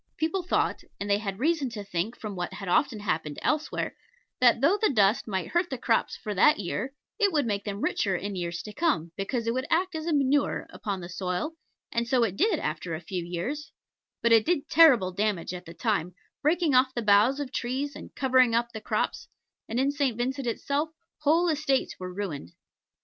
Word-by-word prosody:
People 325 +4 0
thought 355 - 0 0.2
and 200 - -3
they 200 0 +2
had 195 -3 -4
reason 295 +1 +1
to 215 -3 -6
think 195 +4 -3
from 210 -3 -5
what 175 -1 -4
had 195 - -7
often 220 +5 +2
happened 155 -7 -2
elsewhere 305 0 -1 0.4
that 240 -2 +5
though 335 - +3
the 435 - +4
dust 210 -3 +3
might 190 -4 -2
hurt 345 +1 +1
the 265 - -3
crops 230 -1 +1
for 210 - -4
that 295 +10 +5
year, 255 +8 -3 0.2
it 405 -2 +4
would 295 -5 +1
make 205 -3 -2
them 205 0 -4
richer 195 -3 +1
in 200 +2 -4
years 170 -2 -3
to 210 - -8
come, 265 - 0
because 225 +4 -2
it 230 - +1
would 260 +2 -2
act 365 +3 +1
as 320 0 -4
manure 285 -2 +2
upon 200 -4 -4
the 175 - -6
soil; 180 - -2 0.4
and 235 0 -1
so 245 -1 +3
it 195 -5 0
did 395 - +2
after 160 - -3
a - - -5
few 175 +1 -4
years; 180 - -4 0.5
but 235 - +3
it 225 -1 +7
did 330 -1 0
terrible 260 - +6
damage 195 -2 -1
at 180 0 -7
the 165 - -10
time, 180 -4 -1 0.3
breaking 315 0 +2
off 260 +1 +4
the 240 - -1
boughs 210 +7 +4
of 280 -3 -4
trees 265 +4 -2
and - - -11
covering 255 -3 +4
up 235 0 +1
the 220 - -7
crops; - - -2 0.4
and 230 +3 -1
in 275 +2 +2
St. 280 -5 0
Vincent 260 +2 -2
itself 285 +6 -1 0.3
whole 320 +4 +3
estates 295 -4 0
were 185 0 -5
ruined. 180 - -5
235 Hz, 205 wpm, -27 LUFS, 195-285 Hz, 0.5 s, it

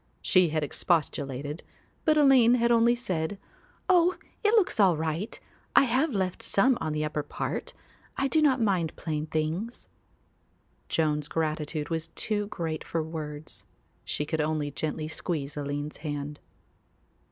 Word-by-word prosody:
She 185 -2 +4
had 155 0 0
expostulated 145 -2 -1 0.4
but 310 -1 +4
Aline 260 -5 +6
had 235 -1 +2
only 235 +1 +5
said, 185 -6 -2 0.5
"Oh, 360 -1 +5 0.3
it 425 +2 +4
looks 390 - +3
all 185 -5 +5
right; 160 +6 -2 0.4
I - - +8
have 265 +5 +2
left 190 -5 -1
some 255 +6 +3
on 155 - -1
the 150 0 -1
upper 150 0 -2
part. 145 - -4 0.4
I 275 - +2
do 315 +3 +2
not 275 -4 +4
mind 185 -8 +1
plain 155 -1 -3
things." 160 +9 -3 1.0
Joan's 150 -2 +1
gratitude 155 -1 -2
was 165 -1 -2
too 210 -1 0
great 165 -5 -4
for 165 -1 -2
words; 155 -1 -6 0.4
she 150 - -2
could 155 +1 -1
only 150 -1 -1
gently 155 +2 -3
squeeze 155 -3 -3
Aline's 145 +1 -4
hand. 145 -1 -5
160 Hz, 140 wpm, -28 LUFS, 150-230 Hz, 1.0 s, I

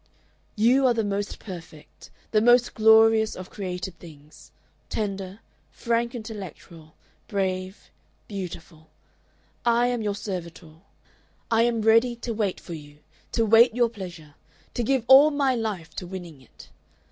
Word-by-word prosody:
"You 250 +5 +4
are 245 - +2
the 225 - 0
most 205 0 -3
perfect, 165 -6 -12 0.2
the 215 - +3
most 240 +1 +4
glorious 220 0 +5
of 185 0 -9
created 180 -2 -6
things 150 -3 -15 0.4
tender, 195 -1 -4 0.3
frank 235 +1 -2
intellectual, 190 -8 -9 0.3
brave, 190 -1 -3 0.4
beautiful. 170 -5 -8 0.7
I 235 0 +3
am 245 -2 -2
your 205 -2 -2
servitor. 175 -5 -7 0.7
I 225 0 +4
am 230 -2 -2
ready 230 +2 +4
to 235 0 -5
wait 210 -4 -2
for 175 - -9
you, 145 -2 -11 0.4
to 230 - +2
wait 225 +2 +5
your 240 -1 +3
pleasure, 175 -8 -10 0.4
to - - -2
give 260 +1 +1
all 270 +4 +8
my 280 -3 +1
life 215 -8 -4
to 180 - -5
winning 175 -6 -9
it. 130 - -17
205 Hz, 135 wpm, -25 LUFS, 180-230 Hz, 0.7 s, all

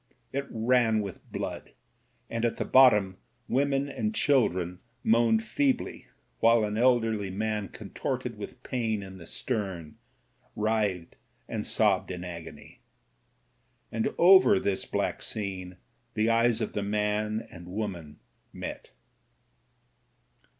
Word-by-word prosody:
It 140 +1 -2
ran 115 -1 +2
with 100 -3 -8
blood; - - -5 0.5
and 115 0 -3
at 120 - +1
the - - -3
bottom 105 -8 +5 0.3
women 140 +1 +1
and 215 +10 -3
chil 140 - +4
dren 90 0 -5 0.2
moaned 115 -1 +3
feebly, 130 +4 -1 0.3
while 115 0 +5
an 105 0 -1
elderly 115 -4 +2
man 105 +1 -2
contorted - - -4
with - - -9
pain 110 -5 -1
in 95 -1 -10
the 85 - -11
stem, 95 -10 -4 0.6
writhed 105 -5 -1 0.3
and - - -3
sobbed - - +2
in 90 -1 -5
agony. 85 -2 -9 1.1
And 115 0 0
over 190 +3 +7
this 100 - -1
black - - -2
scene 95 -3 -4 0.4
the 110 +1 +2
eyes 115 0 +3
of 110 - -2
the 105 - -1
man 105 +1 -1
and 85 +1 -11
the - - -10
woman 90 -7 -5 0.3
met. - - -7
110 Hz, 125 wpm, -28 LUFS, 95-120 Hz, 1.1 s, over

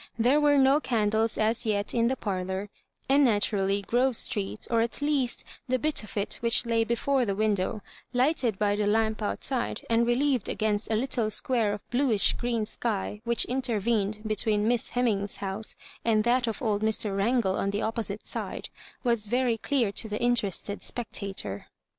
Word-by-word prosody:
There 250 +6 +3
were 290 -1 +4
no 270 +2 +5
candles 220 -4 0
as 220 +1 +1
yet 205 -2 0
in 235 -1 +2
the 260 - 0
parlour, 190 -2 -3 0.4
and 280 +2 +4
naturally 205 -4 +2
Grove 250 +4 +1
Street 205 -1 0
— - - -10
or 230 -1 +3
at 230 0 -2
least 285 -4 0 0.2
the 255 0 +1
bit 305 +4 0
of 215 - -9
it 200 - 0
which 235 +1 +3
lay 230 -1 +2
before 250 +4 0
the 200 -4 -1
window, 205 -1 0 0.3
lighted 250 -4 +1
by 205 0 +1
the 205 0 0
lamp 220 +1 +1
outside, 240 +4 -1
and 230 +1 +3
relieved 255 -1 +1
against 215 -1 -1
a 220 - +1
little 235 -1 0
square 225 0 +1
of 205 -1 -6
bluish 240 -7 +3
green 235 -3 -1
sky 210 -2 -3
which 235 0 +3
intervened 220 -4 0
between 215 0 +1
Miss 240 -1 +1
Hemmings's 210 -5 0
house 200 +2 -4 0.3
and 220 -2 +2
that 240 +1 +2
of 225 +4 -4
old 210 -3 0
Mr. 215 -2 0
Wrangle 200 -1 +1
on 195 - 0
the 200 +1 -2
opposite 220 -2 -3
side - - -5 0.2
— - - -24
was 235 -4 0
very 245 +1 +1
clear 245 -5 0
to 220 +2 -3
the 210 - -3
interested 210 -4 0
spectator. 195 - -3
225 Hz, 175 wpm, -27 LUFS, 205-245 Hz, 0.4 s, no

